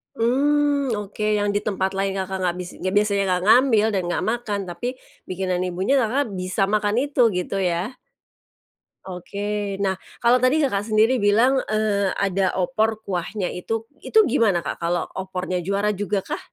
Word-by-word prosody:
Mmm, 280 Hz, +2 st, +2 dB
oke, 210 Hz, +1 st, -4 dB
yang 205 Hz, 0 st, 0 dB
di 205 Hz, -, +1 dB
tempat 190 Hz, -2 st, -1 dB
lain 195 Hz, 0 st, -1 dB
Kakak 190 Hz, 0 st, -3 dB
nggak 175 Hz, -1 st, 0 dB
bis 180 Hz, -1 st, -5 dB
yang 185 Hz, +1 st, -2 dB
biasanya 205 Hz, -1 st, +2 dB
nggak 180 Hz, -1 st, 0 dB
ngambil 225 Hz, -1 st, +5 dB
dan 195 Hz, -, +1 dB
nggak 175 Hz, -, -1 dB
makan 225 Hz, -4 st, -2 dB
tapi 240 Hz, +9 st, -4 dB, 0.3 s
bikinan 185 Hz, -1 st, -2 dB
ibunya 190 Hz, +10 st, +1 dB
Kakak 250 Hz, +1 st, 0 dB
bisa 185 Hz, +1 st, -1 dB
makan 210 Hz, 0 st, +1 dB
itu, 285 Hz, -2 st, 0 dB
gitu 180 Hz, +2 st, -2 dB
ya? 185 Hz, +6 st, -1 dB, 1.1 s
Oke. 200 Hz, +2 st, -4 dB
Nah, 190 Hz, -1 st, +1 dB, 0.3 s
kalau 240 Hz, +1 st, +4 dB
tadi 255 Hz, +4 st, +3 dB
Kakak 205 Hz, -6 st, -1 dB
sendiri 220 Hz, +3 st, +3 dB
bilang, 235 Hz, +6 st, +4 dB
eee, 215 Hz, -2 st, +1 dB
ada 195 Hz, -1 st, 0 dB
opor 220 Hz, +3 st, 0 dB
kuahnya 185 Hz, +1 st, -3 dB
itu 225 Hz, +5 st, -4 dB, 0.2 s
itu 440 Hz, -, +3 dB
gimana 225 Hz, -, +2 dB
Kak, -, -, -4 dB
kalau 170 Hz, +1 st, 0 dB
opornya, 185 Hz, -1 st, -3 dB
juara 200 Hz, +4 st, 0 dB
juga 205 Hz, 0 st, -1 dB
kah? -, -, -4 dB
205 Hz, 165 wpm, -23 LUFS, 190-225 Hz, 1.1 s, ngambil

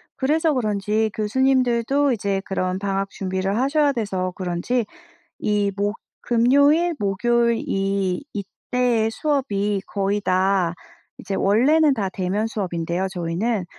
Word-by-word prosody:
그래서 310 Hz, +4 st, +1 dB
그런지 215 Hz, -2 st, 0 dB
교수님들도 260 Hz, +3 st, +2 dB
이제 200 Hz, -3 st, -1 dB
그런 185 Hz, -1 st, -2 dB
방학 195 Hz, 0 st, -2 dB
준비를 190 Hz, 0 st, -2 dB
하셔야 285 Hz, +2 st, +2 dB
돼서 195 Hz, -7 st, -2 dB
그런지 185 Hz, +6 st, -1 dB, 0.6 s
이 205 Hz, -1 st, +1 dB
목 205 Hz, +2 st, -1 dB, 0.3 s
금요일, 285 Hz, +8 st, +3 dB
목요일 235 Hz, +4 st, +1 dB
이 195 Hz, +1 st, -1 dB
이때 225 Hz, +3 st, -1 dB
수업이 210 Hz, -7 st, -1 dB
거의 200 Hz, +1 st, -1 dB
다 185 Hz, -2 st, +1 dB, 0.4 s
이제 195 Hz, -, -5 dB
원래는 280 Hz, +11 st, +4 dB
다 200 Hz, -6 st, -1 dB
대면 190 Hz, +3 st, -2 dB
수업인데요 180 Hz, -4 st, -2 dB
저희는. 180 Hz, +4 st, -1 dB
210 Hz, 265 characters per minute, -22 LUFS, 195-250 Hz, 0.6 s, 원래는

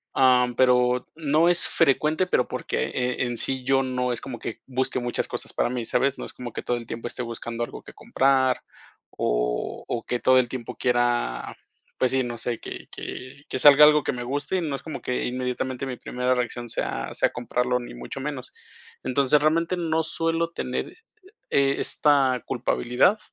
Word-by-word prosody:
Ah, 125 Hz, -1 st, +5 dB
pero, 125 Hz, -1 st, +3 dB
no 155 Hz, +1 st, +2 dB
es 175 Hz, -1 st, +6 dB
frecuente, 155 Hz, +6 st, +2 dB
pero, 180 Hz, -, +1 dB
porque -, -, -2 dB
eh, 125 Hz, 0 st, -2 dB
en 120 Hz, -1 st, -2 dB
sí 130 Hz, -1 st, +3 dB
yo 135 Hz, 0 st, +2 dB
no 125 Hz, -1 st, -1 dB
es -, -, -6 dB
como 125 Hz, -4 st, -7 dB
que 115 Hz, -, -6 dB
busque 130 Hz, 0 st, -1 dB
muchas 120 Hz, 0 st, -2 dB
cosas -, -, -5 dB
para -, -, +1 dB
mí, 120 Hz, -2 st, -3 dB
¿sabes? 135 Hz, +4 st, +1 dB
No -, -, -6 dB
es -, -, -10 dB
como 120 Hz, -2 st, -7 dB
que -, -, -5 dB
todo 120 Hz, -, -1 dB
el 115 Hz, -1 st, -9 dB
tiempo 115 Hz, +1 st, -5 dB
esté 125 Hz, -, -5 dB
buscando 115 Hz, 0 st, -4 dB
algo -, -, -7 dB
que -, -, -13 dB
comprar 130 Hz, -1 st, +2 dB, 0.5 s
o -, -, -1 dB
o 115 Hz, -, -2 dB
que 125 Hz, -, -2 dB
todo 130 Hz, +1 st, +5 dB
el 125 Hz, -, +1 dB
tiempo 120 Hz, -1 st, -6 dB
quiera, 120 Hz, -, 0 dB, 0.4 s
pues 130 Hz, -, +2 dB
sí, 130 Hz, 0 st, +2 dB
no 120 Hz, -1 st, -5 dB
sé 115 Hz, 0 st, -3 dB
que -, -, -8 dB
que 135 Hz, +3 st, -8 dB
que -, -, -2 dB
salga 145 Hz, +1 st, +9 dB
algo 150 Hz, -1 st, +5 dB
que -, -, 0 dB
me 120 Hz, 0 st, -5 dB
guste 145 Hz, +8 st, -2 dB
y -, -, 0 dB
no 150 Hz, -4 st, -2 dB
es 135 Hz, -, -8 dB
como 155 Hz, -4 st, -6 dB
que 125 Hz, -, -2 dB
inmediatamente 125 Hz, +1 st, -3 dB
mi 125 Hz, -, -4 dB
primera 125 Hz, +1 st, -1 dB
reacción 120 Hz, -1 st, -3 dB
sea 60 Hz, -, -2 dB
sea -, -, +2 dB
comprarlo, 125 Hz, +1 st, -1 dB
ni 120 Hz, -, -9 dB
mucho 60 Hz, -, -7 dB
menos. 140 Hz, -3 st, -5 dB, 0.5 s
Entonces, 140 Hz, +3 st, +3 dB
realmente 165 Hz, +4 st, +1 dB
no 160 Hz, -1 st, 0 dB
suelo 165 Hz, +1 st, -1 dB
tener, -, -, -4 dB, 0.6 s
eh, 140 Hz, 0 st, +3 dB
esta 135 Hz, -4 st, +2 dB
culpabilidad 125 Hz, -, +1 dB
130 Hz, 195 wpm, -25 LUFS, 120-140 Hz, 0.6 s, salga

